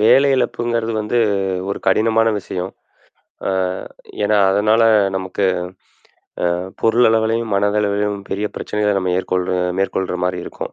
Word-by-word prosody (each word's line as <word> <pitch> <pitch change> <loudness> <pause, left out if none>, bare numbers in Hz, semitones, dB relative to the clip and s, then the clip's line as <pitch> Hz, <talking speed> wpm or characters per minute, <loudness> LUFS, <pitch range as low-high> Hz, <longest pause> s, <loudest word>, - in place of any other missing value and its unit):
வேலை 135 +6 +5
இழப்புங்குறது 120 -2 -1
வந்து 105 +3 0 0.5
ஒரு 100 - -2
கடினமான 110 +3 +3
விஷயம். 95 -1 -5 0.8
ஆ. - - +1 0.7
ஏன்னா 105 0 +3
அதனால 105 +3 +3 0.3
நமக்கு 95 +1 -3 1.1
அ - - +1 0.3
பொருள் 115 +2 +4
அளவிலும், 110 0 +1
மனதளவிலும் 105 0 0
பெரிய 105 +2 -1
பிரச்சனைகளை 105 -2 -1
மேற்கொள்ற 90 0 -1 0.3
மேற்கொள்ற 95 -1 -1
மாதிரி 90 0 -1
இருக்கும். - - -7
105 Hz, 110 wpm, -19 LUFS, 95-115 Hz, 1.1 s, வேலை